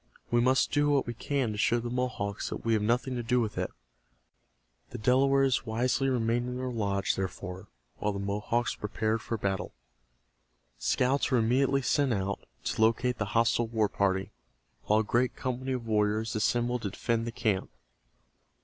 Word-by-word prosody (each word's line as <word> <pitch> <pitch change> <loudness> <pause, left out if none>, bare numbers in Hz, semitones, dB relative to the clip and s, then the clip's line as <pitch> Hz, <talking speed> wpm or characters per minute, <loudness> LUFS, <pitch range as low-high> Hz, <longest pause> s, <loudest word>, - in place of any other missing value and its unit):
We 120 0 +4
must 130 +2 +3
do 145 0 +2
what 140 -2 +2
we 120 - -4
can 130 -1 -1
to 105 - -5
show 120 +2 +3
the 120 0 -4
Mohawks 125 -5 -2
that - - -6
we 115 - +2
have 110 - +2
nothing 120 +4 +1
to - - -1
do 125 +2 +1
with 110 -3 -1
it." - - -1 1.2
The - - -7
Delawares 135 +1 +3
wisely 125 +4 +1
remained 120 -1 +1
in 125 0 -4
their 130 0 -3
lodge, 100 -4 0
therefore, 95 0 -5 0.3
while 105 - -1
the 100 - -4
Mohawks 105 +4 -1
prepared 110 +1 -2
for 115 - -3
battle. 100 -2 -2 1.0
Scouts 130 - +1
were 130 - +3
immediately 130 +4 +2
sent 140 0 +2
out 100 0 -3 0.2
to - - -2
locate 115 +2 +2
the 110 - 0
hostile 115 0 +3
war 110 -2 +1
party, 95 -1 0 0.5
while 105 +1 +3
a - - -2
great 120 +4 +1
company 130 +1 -3
of 125 -2 -4
warriors 110 +1 +1
assembled 120 +3 +1
to 100 - -2
defend 115 +4 -1
the - - -2
camp. 105 -4 -1
115 Hz, 175 wpm, -29 LUFS, 105-125 Hz, 1.2 s, We